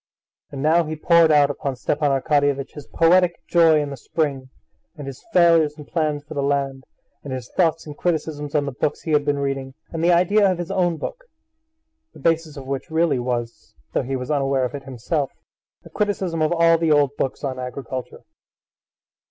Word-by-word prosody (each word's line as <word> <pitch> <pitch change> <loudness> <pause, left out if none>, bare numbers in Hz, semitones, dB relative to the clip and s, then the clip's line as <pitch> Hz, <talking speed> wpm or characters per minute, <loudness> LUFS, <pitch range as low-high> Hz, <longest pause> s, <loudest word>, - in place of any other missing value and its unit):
And 140 -1 -5
now 165 +3 +4
he 155 0 -5
poured 165 +1 +4
out 145 -1 +5
upon 140 -1 -4
Stepan 145 +3 0
Arkadyevitch 140 0 +1
his 150 -2 -11
poetic 175 +1 +3
joy 165 -3 +4
in 145 -1 -3
the - - -5
spring, 140 -2 -2 0.5
and 145 - -7
his 135 -2 -9
failures 165 -5 +4
and 150 -1 -11
plans 150 -3 -1
for 145 - -10
the 140 - -2
land, 140 -1 -1 0.4
and 140 - -7
his 130 -2 -5
thoughts 165 -2 +1
and 150 -2 -8
criticisms 155 -3 -2
on 145 -1 +2
the 140 - -3
books 140 +3 -2
he 160 - -3
had 150 -1 +3
been 145 0 0
reading, 135 -1 -3 0.2
and 165 -1 -3
the 175 - +4
idea 190 +3 +4
of 185 - -2
his 175 +2 -5
own 175 -3 +1
book, - - -6 0.9
the - - -14
basis 165 -2 0
of 135 - -8
which 135 0 -4
really 160 -4 +1
was, 120 -1 -4 0.2
though - - +1
he 135 +2 -3
was 130 +3 -4
unaware 135 -2 +1
of 125 - -5
it 140 -1 -7
himself, 135 +3 -2 0.5
a - - -12
criticism 190 -5 -1
of 155 - +2
all 165 -1 +4
the 165 -1 +1
old 145 -2 +3
books 135 -1 -3
on 130 -2 -3
agriculture. 130 0 -6
150 Hz, 195 wpm, -22 LUFS, 135-165 Hz, 0.9 s, out